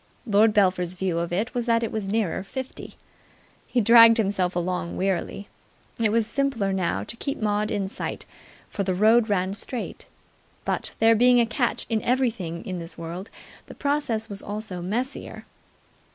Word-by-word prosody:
Lord 215 Hz, 0 st, +4 dB
Belpher's 185 Hz, -3 st, +2 dB
view 180 Hz, -2 st, -1 dB
of 170 Hz, 0 st, -3 dB
it 205 Hz, +7 st, -1 dB
was 245 Hz, -1 st, -2 dB
that 230 Hz, 0 st, +3 dB
it 225 Hz, -, -2 dB
was 215 Hz, -3 st, -3 dB
nearer 205 Hz, -3 st, 0 dB
fifty. 260 Hz, +6 st, -7 dB, 0.7 s
He 250 Hz, -, +1 dB
dragged 230 Hz, +1 st, +8 dB
himself 195 Hz, -4 st, 0 dB
along 180 Hz, 0 st, -2 dB
wearily. 195 Hz, +1 st, -2 dB, 0.5 s
It 220 Hz, -2 st, +2 dB
was 230 Hz, 0 st, +2 dB
simpler 230 Hz, -5 st, 0 dB
now 185 Hz, -2 st, -1 dB
to -, -, -5 dB
keep 275 Hz, +4 st, -4 dB
Maud 210 Hz, 0 st, 0 dB
in 200 Hz, -2 st, -1 dB
sight, 190 Hz, -, -5 dB, 0.4 s
for 200 Hz, -, -3 dB
the 185 Hz, -1 st, -1 dB
road 220 Hz, +3 st, +4 dB
ran 190 Hz, -1 st, 0 dB
straight: 235 Hz, +4 st, -5 dB, 0.6 s
but, -, -, -1 dB
there 225 Hz, +1 st, +5 dB
being 245 Hz, +2 st, +5 dB
a 235 Hz, -, +4 dB
catch 235 Hz, +2 st, -1 dB
in 220 Hz, -2 st, 0 dB
everything 230 Hz, -10 st, -1 dB
in 185 Hz, -2 st, -4 dB
this 165 Hz, 0 st, -7 dB
world, 170 Hz, +5 st, -6 dB, 0.4 s
the -, -, -11 dB
process 280 Hz, -7 st, -1 dB
was 200 Hz, -2 st, -6 dB
also 205 Hz, -3 st, -5 dB
messier. 235 Hz, +9 st, -4 dB
210 Hz, 165 wpm, -25 LUFS, 185-230 Hz, 0.7 s, dragged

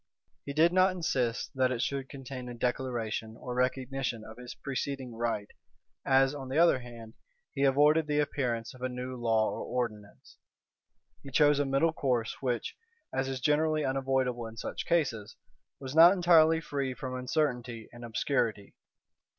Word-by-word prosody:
He 140 Hz, -, -3 dB
did 165 Hz, +4 st, +4 dB
not 185 Hz, 0 st, +4 dB
insist 125 Hz, -9 st, -1 dB
that 130 Hz, -1 st, +2 dB
it 125 Hz, -, -2 dB
should 135 Hz, +1 st, -2 dB
contain 130 Hz, -2 st, -7 dB
a 120 Hz, -, -7 dB
declaration 115 Hz, -3 st, -2 dB
or 125 Hz, -, -5 dB
recognition 130 Hz, -1 st, -1 dB
of 110 Hz, +1 st, -11 dB
his 125 Hz, -1 st, -9 dB
preceding 135 Hz, -2 st, -4 dB
right; 115 Hz, -3 st, -2 dB, 0.5 s
as, 135 Hz, +1 st, +4 dB
on 135 Hz, -3 st, -7 dB
the 135 Hz, -, -2 dB
other 170 Hz, -5 st, +5 dB
hand, 115 Hz, -2 st, -11 dB, 0.4 s
he 140 Hz, -, +1 dB
avoided 150 Hz, +3 st, +4 dB
the 150 Hz, -1 st, 0 dB
appearance 125 Hz, -6 st, -1 dB
of 130 Hz, -, -15 dB
a 130 Hz, -, -1 dB
new 125 Hz, +1 st, -5 dB
law 115 Hz, -3 st, +1 dB
or -, -, -5 dB
ordinance. 110 Hz, -5 st, -5 dB, 0.8 s
He 140 Hz, -, -10 dB
chose 145 Hz, +1 st, +4 dB
a 145 Hz, -, +2 dB
middle 140 Hz, +4 st, +2 dB
course 125 Hz, -6 st, -1 dB
which, 125 Hz, -3 st, -2 dB, 0.4 s
as 135 Hz, 0 st, -1 dB
is 135 Hz, -1 st, -3 dB
generally 155 Hz, +2 st, +2 dB
unavoidable 130 Hz, -3 st, 0 dB
in 110 Hz, 0 st, -11 dB
such -, -, -5 dB
cases, 120 Hz, -10 st, 0 dB, 0.4 s
was 130 Hz, -1 st, -6 dB
not 165 Hz, +3 st, +8 dB
entirely 165 Hz, -3 st, +5 dB
free 140 Hz, -4 st, -3 dB
from 130 Hz, -2 st, -5 dB
uncertainty 125 Hz, -3 st, -2 dB
and 120 Hz, 0 st, -11 dB
obscurity. 115 Hz, -3 st, -1 dB
130 Hz, 160 wpm, -30 LUFS, 120-145 Hz, 0.8 s, not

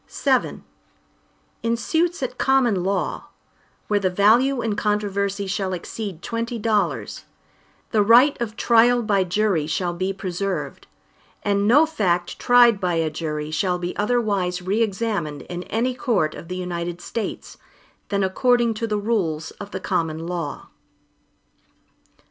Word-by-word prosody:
VII 265 Hz, -3 st, +1 dB, 1.0 s
In 230 Hz, 0 st, 0 dB
suits 330 Hz, +6 st, 0 dB
at 250 Hz, 0 st, -4 dB
common 245 Hz, -9 st, +2 dB
law, 195 Hz, 0 st, -2 dB, 0.6 s
where 205 Hz, -1 st, +2 dB
the 190 Hz, -2 st, +1 dB
value 230 Hz, +8 st, +3 dB
in 220 Hz, -2 st, -1 dB
controversy 200 Hz, -1 st, -1 dB
shall 190 Hz, -1 st, -2 dB
exceed 185 Hz, 0 st, -6 dB
twenty 230 Hz, +1 st, -3 dB
dollars, 215 Hz, -1 st, -1 dB, 0.7 s
the 215 Hz, -, +3 dB
right 240 Hz, +7 st, +6 dB
of 220 Hz, -2 st, -3 dB
trial 235 Hz, +1 st, +4 dB
by 200 Hz, -3 st, +2 dB
jury 185 Hz, -4 st, 0 dB
shall 175 Hz, +2 st, -1 dB
be 185 Hz, +2 st, -2 dB
preserved, 185 Hz, -5 st, -4 dB, 0.6 s
and 200 Hz, 0 st, +1 dB
no 290 Hz, +8 st, +6 dB
fact 180 Hz, -, -1 dB
tried 240 Hz, -3 st, +5 dB
by 180 Hz, -3 st, 0 dB
a 160 Hz, -1 st, 0 dB
jury 150 Hz, -1 st, -4 dB
shall 180 Hz, +3 st, 0 dB
be 175 Hz, 0 st, -4 dB
otherwise 205 Hz, -5 st, 0 dB
re 195 Hz, +5 st, -1 dB
examined 195 Hz, -, -2 dB
in 175 Hz, 0 st, -6 dB
any 240 Hz, +3 st, -1 dB
court 205 Hz, -11 st, 0 dB
of -, -, -10 dB
the 180 Hz, +1 st, -5 dB
United 175 Hz, -1 st, -4 dB
States, 225 Hz, +4 st, -5 dB, 0.5 s
than 200 Hz, -1 st, 0 dB
according 235 Hz, +4 st, +2 dB
to 230 Hz, +1 st, -3 dB
the 210 Hz, -1 st, -1 dB
rules 195 Hz, -8 st, -1 dB
of 205 Hz, -, -7 dB
the 190 Hz, -, -5 dB
common 165 Hz, -3 st, -2 dB
law. 170 Hz, -4 st, -5 dB
200 Hz, 140 wpm, -22 LUFS, 180-230 Hz, 1.0 s, right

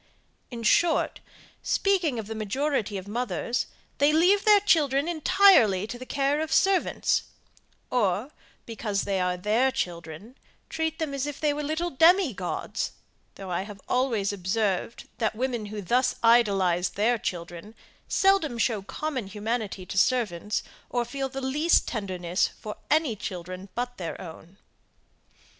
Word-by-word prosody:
In 235 Hz, -2 st, -7 dB
short, 325 Hz, +9 st, +2 dB, 0.4 s
speaking 365 Hz, -10 st, +1 dB
of 220 Hz, -, -4 dB
the 220 Hz, -, -6 dB
majority 220 Hz, 0 st, -1 dB
of 190 Hz, +1 st, -8 dB
mothers, 235 Hz, 0 st, -2 dB, 0.3 s
they 285 Hz, +1 st, +5 dB
leave 365 Hz, +6 st, +4 dB
their 420 Hz, -1 st, +7 dB
children 300 Hz, -7 st, +2 dB
entirely 315 Hz, -, +5 dB
to 240 Hz, +3 st, -7 dB
the 255 Hz, -, -9 dB
care 285 Hz, +2 st, 0 dB
of 315 Hz, 0 st, -3 dB
servants: 385 Hz, +1 st, +2 dB, 0.7 s
or, 220 Hz, +2 st, 0 dB, 0.3 s
because 215 Hz, -3 st, -2 dB
they 195 Hz, -1 st, -1 dB
are 180 Hz, 0 st, 0 dB
their 220 Hz, +8 st, +2 dB
children, 170 Hz, -, -5 dB, 0.3 s
treat 320 Hz, 0 st, -2 dB
them 315 Hz, -4 st, -3 dB
as 275 Hz, +1 st, -2 dB
if 290 Hz, -, -6 dB
they 300 Hz, -1 st, +1 dB
were 295 Hz, -, -3 dB
little 315 Hz, +4 st, -2 dB
demi 330 Hz, -, +5 dB
gods, 185 Hz, -2 st, -4 dB, 0.4 s
though 190 Hz, -2 st, -8 dB
I 175 Hz, -, 0 dB
have 200 Hz, 0 st, -9 dB
always 230 Hz, -6 st, 0 dB
observed, 200 Hz, +2 st, -2 dB
that 220 Hz, -2 st, +1 dB
the -, -, -16 dB
women 240 Hz, -4 st, -2 dB
who 210 Hz, 0 st, -6 dB
thus 245 Hz, +8 st, +2 dB
idolize 195 Hz, -7 st, +3 dB
their 230 Hz, +3 st, +1 dB
children, 175 Hz, +4 st, -6 dB, 0.3 s
seldom 385 Hz, -10 st, +2 dB
show 225 Hz, -3 st, 0 dB
common 255 Hz, +2 st, -4 dB
humanity 210 Hz, -1 st, -3 dB
to 190 Hz, -, -1 dB
servants, 210 Hz, -4 st, 0 dB, 0.3 s
or 240 Hz, -1 st, -1 dB
feel 270 Hz, +2 st, -4 dB
the 270 Hz, +1 st, -6 dB
least 295 Hz, +6 st, +2 dB
tenderness 185 Hz, -5 st, -1 dB
for 210 Hz, -, -9 dB
any 305 Hz, -7 st, +2 dB
children 185 Hz, -1 st, -7 dB
but 245 Hz, 0 st, -3 dB
their 170 Hz, -3 st, -5 dB
own. 175 Hz, +1 st, -11 dB
230 Hz, 150 wpm, -26 LUFS, 195-285 Hz, 0.7 s, their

